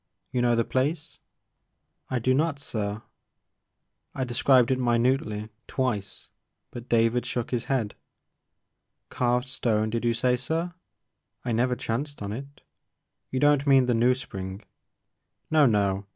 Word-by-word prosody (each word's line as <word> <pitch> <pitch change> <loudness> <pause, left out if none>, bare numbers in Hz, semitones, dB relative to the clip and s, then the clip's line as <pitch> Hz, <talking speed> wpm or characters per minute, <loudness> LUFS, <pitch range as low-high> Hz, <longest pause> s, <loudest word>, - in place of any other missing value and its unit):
You 125 - 0
know 120 -1 +3
the 115 -1 +1
place? 145 +4 -2 0.2
' - - -52
' - - -48
I 130 - -2
"I - - +3
do 130 +2 +2
not 150 +2 +1
sir." 110 -6 -4 1.1
I 130 - -1
described 125 0 +3
it 130 - +1
minutely, 120 -3 +1 0.2
twice, 110 -8 -3 0.4
but 120 0 -9
David 115 +1 +3
shook 120 -2 -3
his 120 -3 -1
head. 120 -7 -1 1.2
"Carved 125 0 +1
stone 110 -5 0
did 115 +1 -2
you 120 -1 +2
say 125 +1 +2
sir? 165 +7 -2 0.7
I 120 - -1
never 125 +2 +1
chanced 135 +2 -3
on 100 0 -4
it. 140 +4 -9 0.7
You 130 - -2
don't 145 0 +3
mean 135 -2 +6
the 125 - +2
New! 120 +2 +3
Spring 95 -5 -7 0.4
" - - -48
No, 155 -3 +6
no 100 -3 +1
125 Hz, 150 wpm, -26 LUFS, 115-130 Hz, 1.2 s, mean